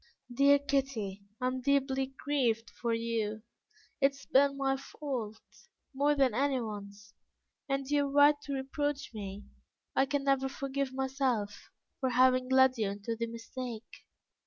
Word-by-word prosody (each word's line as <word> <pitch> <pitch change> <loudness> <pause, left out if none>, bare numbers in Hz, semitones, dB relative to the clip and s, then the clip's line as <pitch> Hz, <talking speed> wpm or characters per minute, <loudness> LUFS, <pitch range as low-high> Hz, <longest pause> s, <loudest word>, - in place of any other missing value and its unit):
Dear 280 +3 +6
Kitty, 270 -8 -2 0.2
I 250 - -2
am 255 0 -1
deeply 270 0 +1
grieved 240 -6 0
for 235 - -3
you: 225 -2 -2 0.6
it 275 0 +4
has 275 - -14
been 275 +1 +3
my 270 -1 +1
fault, 260 -5 -5 0.5
more 290 +2 +2
than 270 -4 +3
anyone's, 210 -6 -3 0.6
and 275 0 -1
you 290 0 +2
are - - -6
right 290 +1 +6
to 280 - -4
reproach 280 +2 -2
me; 200 -1 -7 0.5
I 270 - +3
can 285 0 -1
never 270 -1 +2
forgive 275 0 -3
myself 260 -6 -2 0.3
for 260 - 0
having 255 0 +4
led 260 -1 +5
you 210 -2 +1
into 205 +3 -4
the 230 +1 -2
mistake." 230 0 -8
265 Hz, 145 wpm, -31 LUFS, 230-275 Hz, 0.6 s, Dear